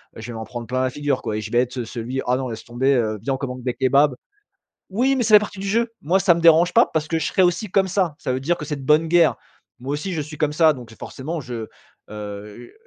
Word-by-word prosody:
heu, 110 Hz, -, -9 dB
je 110 Hz, -, -8 dB
vais 120 Hz, -, -6 dB
m'en 110 Hz, -, -5 dB
prendre 120 Hz, -2 st, -7 dB
plein 130 Hz, +1 st, -1 dB
la 130 Hz, -, +1 dB
figure, 145 Hz, -2 st, -1 dB
quoi 105 Hz, -, -2 dB
et -, -, -3 dB
je 105 Hz, -, -7 dB
vais 120 Hz, -, +1 dB
être, 125 Hz, +1 st, -1 dB
heu, 120 Hz, -, -3 dB
celui: 120 Hz, +3 st, -4 dB
«Ah, 125 Hz, +1 st, +2 dB
non, 130 Hz, -2 st, -3 dB
laisse 110 Hz, -, -7 dB
tomber! 130 Hz, +3 st, +1 dB
Heu, 110 Hz, -4 st, 0 dB
viens, 135 Hz, +3 st, -1 dB
on -, -, -2 dB
commande 125 Hz, -2 st, -6 dB
des 125 Hz, -2 st, -1 dB
kebabs». 135 Hz, +2 st, +3 dB, 0.8 s
Oui, 255 Hz, +7 st, +1 dB
mais 245 Hz, -, +1 dB
c'est 215 Hz, 0 st, +1 dB
la -, -, +10 dB
partie 205 Hz, -2 st, -6 dB
du 195 Hz, -, -4 dB
jeu! 230 Hz, +3 st, +1 dB
Moi, 180 Hz, +6 st, +2 dB
ça 175 Hz, -, +5 dB
me -, -, -2 dB
dérange 170 Hz, +2 st, +5 dB
pas 235 Hz, -, +6 dB
parce 155 Hz, -1 st, -2 dB
que 165 Hz, -1 st, 0 dB
je -, -, -2 dB
serai 190 Hz, -, +1 dB
aussi 180 Hz, +3 st, +1 dB
comme 190 Hz, 0 st, +2 dB
ça. 180 Hz, -5 st, 0 dB
Ça 130 Hz, -, -2 dB
veut 130 Hz, -, -1 dB
dire 165 Hz, +6 st, 0 dB
que 150 Hz, -, -7 dB
c'est 150 Hz, 0 st, -4 dB
de 135 Hz, -, -9 dB
bonne 155 Hz, +3 st, +4 dB
guerre. 170 Hz, -2 st, +4 dB, 0.4 s
Moi 130 Hz, +3 st, -5 dB
aussi, 175 Hz, +5 st, -3 dB
je 155 Hz, -, -2 dB
suis 150 Hz, 0 st, -8 dB
comme 150 Hz, -1 st, 0 dB
ça 160 Hz, 0 st, +5 dB
donc 125 Hz, -4 st, -11 dB
j'ai 110 Hz, -, -14 dB
forcément, 155 Hz, +4 st, -6 dB
je, 120 Hz, -3 st, -6 dB, 0.4 s
heu, 105 Hz, -, -9 dB
140 Hz, 295 wpm, -22 LUFS, 125-170 Hz, 0.8 s, la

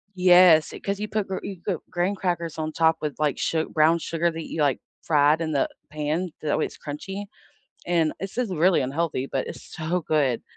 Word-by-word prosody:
Yes, 180 Hz, -3 st, +6 dB
it -, -, -10 dB
'cause 200 Hz, 0 st, -2 dB
you 210 Hz, -, -3 dB
put 210 Hz, -1 st, -2 dB
gr 190 Hz, -, -3 dB
you 195 Hz, -, -6 dB
got 195 Hz, -, -1 dB
graham 185 Hz, +3 st, 0 dB
crackers 170 Hz, -4 st, -2 dB
on 155 Hz, 0 st, -2 dB
top 160 Hz, 0 st, +3 dB
with, 150 Hz, -2 st, -3 dB
like, 150 Hz, -2 st, 0 dB
su 160 Hz, -1 st, 0 dB
brown 160 Hz, +2 st, +4 dB
sugar 170 Hz, +1 st, -1 dB
that 165 Hz, -1 st, -6 dB
you, 160 Hz, -, -2 dB
like, 140 Hz, -4 st, +2 dB, 0.2 s
fried 150 Hz, 0 st, +3 dB
in 160 Hz, -1 st, -1 dB
the 140 Hz, -, +1 dB, 0.2 s
pan, 155 Hz, +4 st, -2 dB
that 150 Hz, -1 st, 0 dB
way -, -, +1 dB
it's -, -, -9 dB
crunchy, 190 Hz, +7 st, -6 dB, 0.6 s
and 165 Hz, -3 st, +2 dB
it's 195 Hz, 0 st, -6 dB
just 240 Hz, -7 st, -1 dB
really 175 Hz, 0 st, +3 dB
unhealthy, 140 Hz, 0 st, -1 dB
but 135 Hz, -1 st, -3 dB
it's -, -, -8 dB
so 170 Hz, +2 st, -1 dB
good. 140 Hz, -7 st, +1 dB
165 Hz, 210 wpm, -25 LUFS, 150-180 Hz, 0.6 s, Yes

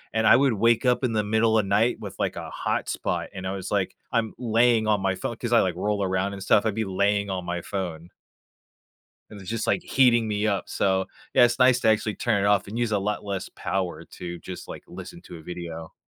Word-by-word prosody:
And 110 Hz, 0 st, +2 dB
I -, -, +8 dB
would 135 Hz, 0 st, +3 dB
wake 115 Hz, +3 st, +2 dB
up 125 Hz, +1 st, +2 dB
in 125 Hz, -3 st, +1 dB
the 105 Hz, -1 st, +1 dB
middle 110 Hz, +1 st, +2 dB
of 105 Hz, -, +2 dB
night 105 Hz, +5 st, +2 dB
with, -, -, -8 dB
like, -, -, -1 dB
a -, -, -6 dB
hot -, -, -2 dB
spot, -, -, -2 dB
and 95 Hz, -1 st, -5 dB
I -, -, -2 dB
was, 95 Hz, -2 st, -6 dB
like, 100 Hz, -2 st, 0 dB, 0.2 s
I'm 115 Hz, -2 st, 0 dB
laying 115 Hz, -1 st, +3 dB
on 105 Hz, -2 st, +2 dB
my 95 Hz, 0 st, 0 dB
phone, 115 Hz, -, -4 dB
'cause 120 Hz, 0 st, -3 dB
I, 120 Hz, -, +6 dB
like, 90 Hz, -3 st, -1 dB
roll 105 Hz, +2 st, -1 dB
around 95 Hz, +1 st, -1 dB
and 100 Hz, -1 st, -7 dB
stuff, 100 Hz, -, +3 dB
I'd 110 Hz, -2 st, 0 dB
be 110 Hz, 0 st, -1 dB
laying 100 Hz, +1 st, 0 dB
on 95 Hz, -2 st, -3 dB
my 85 Hz, 0 st, -3 dB
phone. 85 Hz, -3 st, -5 dB, 1.2 s
And 105 Hz, -, -11 dB
it -, -, -11 dB
was 95 Hz, -, -8 dB
just, 115 Hz, -1 st, -2 dB
like, -, -, +1 dB
heating 120 Hz, -4 st, +3 dB
me 105 Hz, 0 st, 0 dB
up. 100 Hz, -2 st, 0 dB
So, 95 Hz, -1 st, +1 dB, 0.3 s
yeah, -, -, +6 dB
it's 120 Hz, +1 st, -1 dB
nice 125 Hz, -1 st, +5 dB
to -, -, +1 dB
actually 110 Hz, -1 st, +2 dB
turn 105 Hz, -5 st, 0 dB
it -, -, +2 dB
off, 100 Hz, -1 st, +2 dB
and 105 Hz, +3 st, -6 dB
use 120 Hz, -2 st, 0 dB
a 105 Hz, -, +2 dB
lot 105 Hz, +2 st, -2 dB
less 100 Hz, -2 st, -4 dB
power 90 Hz, -4 st, -3 dB
to 85 Hz, -1 st, -8 dB
just, 90 Hz, -, -8 dB
like, -, -, -8 dB
listen -, -, -10 dB
to -, -, -10 dB
a -, -, -12 dB
video. 80 Hz, -1 st, -7 dB
105 Hz, 250 wpm, -25 LUFS, 95-115 Hz, 1.2 s, I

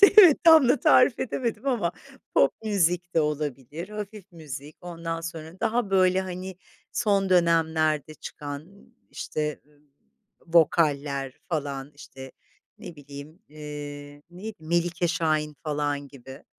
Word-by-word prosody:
işte, 400 Hz, -, +11 dB
evet, 355 Hz, -8 st, +9 dB
tam 320 Hz, -6 st, +8 dB
da 255 Hz, 0 st, +3 dB
tarif 250 Hz, -1 st, +5 dB
edemedim 235 Hz, -1 st, -3 dB
ama. 225 Hz, -11 st, 0 dB, 0.4 s
Pop -, -, +5 dB
müzik 180 Hz, -3 st, +1 dB
de 165 Hz, -, +4 dB
olabilir, 150 Hz, +2 st, -3 dB
hafif 210 Hz, -2 st, -8 dB
müzik, 150 Hz, -2 st, -9 dB
ondan 165 Hz, -1 st, -5 dB
sonra 165 Hz, +1 st, -8 dB
daha, 230 Hz, -2 st, 0 dB
böyle, 185 Hz, -1 st, +4 dB
hani, 185 Hz, 0 st, -6 dB, 0.4 s
son 200 Hz, -4 st, +1 dB
dönemlerde 160 Hz, -4 st, +2 dB
çıkan, 145 Hz, 0 st, -8 dB, 0.4 s
işte, 150 Hz, -1 st, -4 dB
eee, 150 Hz, -1 st, -27 dB, 0.7 s
vokaller, 145 Hz, -5 st, +2 dB
falan, 140 Hz, -3 st, -3 dB
işte, 135 Hz, -2 st, -11 dB, 0.5 s
ne 175 Hz, -3 st, -10 dB
bileyim, 145 Hz, +4 st, -11 dB
eee, 145 Hz, -1 st, -8 dB
neydi? 200 Hz, +5 st, -8 dB
Melike 175 Hz, +2 st, 0 dB
Şahin, 155 Hz, -2 st, 0 dB
falan, 145 Hz, -2 st, -2 dB
gibi. 135 Hz, 0 st, -12 dB
165 Hz, 125 wpm, -26 LUFS, 145-185 Hz, 0.7 s, işte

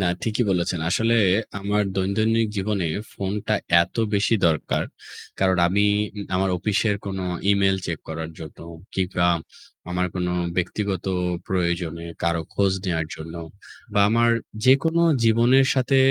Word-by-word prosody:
না, 95 Hz, -, +1 dB, 0.2 s
ঠিকই 115 Hz, +2 st, 0 dB
বলেছেন। 90 Hz, -2 st, 0 dB
আসলে 115 Hz, +5 st, +2 dB, 0.4 s
আমার 105 Hz, +1 st, +1 dB
দৈনন্দিন 110 Hz, +4 st, +1 dB
জীবনে 100 Hz, -2 st, -1 dB, 0.3 s
ফোনটা 100 Hz, +1 st, -2 dB, 0.3 s
এত 85 Hz, -, -8 dB, 0.2 s
বেশি 105 Hz, +3 st, +2 dB
দরকার। 80 Hz, -3 st, 0 dB, 0.6 s
কারণ 95 Hz, -1 st, +3 dB
আমি 100 Hz, +3 st, +2 dB, 0.5 s
আমার 95 Hz, +1 st, +1 dB
অফিসের 105 Hz, +2 st, +1 dB
কোনো 95 Hz, -1 st, -3 dB, 0.3 s
ইমেইল 100 Hz, -1 st, +3 dB
চেক 85 Hz, -3 st, -3 dB
করার 80 Hz, 0 st, -5 dB
জন্য 80 Hz, -2 st, -10 dB, 0.4 s
কিংবা 90 Hz, -2 st, 0 dB, 0.6 s
আমার 90 Hz, +1 st, 0 dB
কোনো 90 Hz, -1 st, -1 dB, 0.2 s
ব্যক্তিগত 95 Hz, +1 st, -2 dB, 0.4 s
প্রয়োজনে 85 Hz, -2 st, -1 dB, 0.2 s
কারো 85 Hz, -1 st, +1 dB
খোঁজ 100 Hz, -1 st, +2 dB
নেয়ার 80 Hz, -4 st, -1 dB
জন্য 80 Hz, +1 st, -9 dB, 0.6 s
বা 100 Hz, -, +4 dB
আমার 115 Hz, +1 st, +3 dB, 0.3 s
যেকোনো 160 Hz, +6 st, +4 dB, 0.2 s
জীবনের 120 Hz, +4 st, +4 dB
সাথে 130 Hz, +1 st, +2 dB
95 Hz, 125 wpm, -23 LUFS, 90-110 Hz, 0.6 s, বা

